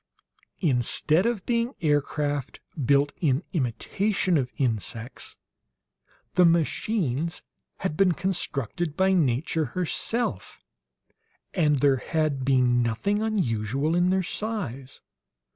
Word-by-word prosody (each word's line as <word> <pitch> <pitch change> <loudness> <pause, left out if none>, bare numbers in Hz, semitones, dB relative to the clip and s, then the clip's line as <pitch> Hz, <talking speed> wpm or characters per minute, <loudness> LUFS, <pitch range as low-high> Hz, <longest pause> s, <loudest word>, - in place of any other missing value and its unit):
Instead 155 - +2
of 230 -6 -2
being 235 +2 0
aircraft 145 -2 -1 0.2
built 140 +2 +3
in 145 -1 +2
imitation 180 - 0
of 130 -5 0
insects, 115 0 -2 1.0
the 180 - +5
machines 165 - +1 0.4
had 185 -5 -1
been 185 +1 +4
constructed 165 - -2
by 190 0 +3
nature 155 0 +1
herself, 185 - -1 0.9
and 150 -5 +2
there 140 -2 +4
had 155 -1 -1
been 125 -2 +3
nothing 160 - 0
unusual 140 - 0
in 175 +1 +3
their 190 0 +2
size. 160 - -5
155 Hz, 100 wpm, -26 LUFS, 130-185 Hz, 1.0 s, the